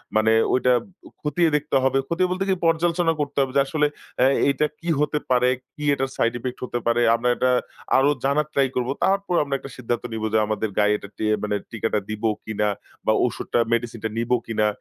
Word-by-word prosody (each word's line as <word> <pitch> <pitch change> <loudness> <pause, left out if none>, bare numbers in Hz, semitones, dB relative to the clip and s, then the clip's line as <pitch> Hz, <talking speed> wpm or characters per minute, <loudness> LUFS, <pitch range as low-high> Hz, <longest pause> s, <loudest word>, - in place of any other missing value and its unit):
মানে 110 +1 +4 0.2
ঐটা 125 0 +3 0.5
খতিয়ে 165 +2 +2
দেখতে 150 -1 -1
হবে। 135 0 +2
খতিয়ে 180 +2 +1
বলতে 185 +1 -1
কি 190 - +3
পর্যালোচনা 165 0 +2
করতে 145 -1 -4
হবে 135 -1 0
যে - - +6
আসলে 150 +1 +1 0.3
অ্যাঁ 130 +2 +4 0.2
এটা 150 - +1
কী 170 - -5
হতে 150 0 +1
পারে, 125 0 +4 0.3
কি 150 - -8
এটার 135 -1 -1
সাইড 115 +1 +2
ইফেক্ট 125 +1 -5
হতে 120 - -3
পারে। 120 +1 +3
আমরা 120 +1 0
এটা 130 0 +2 0.5
আরো 135 +2 +4
জানার 145 +2 +1
ট্রাই 135 -1 +3
করব। 125 0 -1 0.2
তারপর 195 -2 +1
আমরা 140 -1 -2
একটা 135 - -10
সিদ্ধান্ত 120 -1 -2
নিব 110 -1 -4
যে - - +5
আমাদের 110 0 -1
গায়ে 105 0 +4
এটা 100 - -11
টিয়ে 110 - -1
ইয়ে 105 - 0
মানে 105 -1 0 0.2
টিকাটা 110 -1 -1
দিব 110 +1 -5 0.2
কিনা 105 -1 -1 0.4
বা - - +4
ঔষুধটা - - -1
মেডিসিন 115 -1 -1
টা 110 - 0
নিবো 120 +2 +1
কিনা। 110 -2 +1
130 Hz, 205 wpm, -23 LUFS, 115-150 Hz, 0.5 s, যে